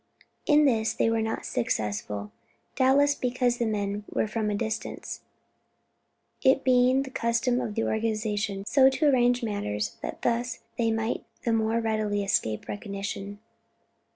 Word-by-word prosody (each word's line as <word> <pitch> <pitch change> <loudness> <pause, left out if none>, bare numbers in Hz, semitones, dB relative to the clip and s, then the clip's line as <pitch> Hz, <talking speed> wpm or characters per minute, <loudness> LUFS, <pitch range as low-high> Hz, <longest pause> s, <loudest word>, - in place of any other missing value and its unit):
In 300 -1 +5
this 225 -4 +2
they 225 - +1
were 225 0 +1
not 220 0 -3
successful; 105 -3 -2 0.4
doubtless 280 +2 +4
because 250 -2 0
the 235 - +1
men 205 -1 -2
were - - 0
from 215 0 -1
a 205 - 0
distance, 220 +1 -4 1.2
it 265 0 +4
being 255 +1 +4
the 265 - -9
custom 235 +1 +1
for - - -2
the 225 +2 -1
organization 215 -2 -1
so 265 +4 +5
to 270 +4 0
arrange 245 -2 +3
matters 105 - -2
that - - -6
thus 240 0 -1 0.2
they 230 -1 +2
might 225 +1 -1 0.2
the 230 - +1
more 225 +1 +1
readily 215 -2 0
escape 110 - 0
recognition. 200 -1 -5
225 Hz, 145 wpm, -27 LUFS, 205-245 Hz, 1.2 s, In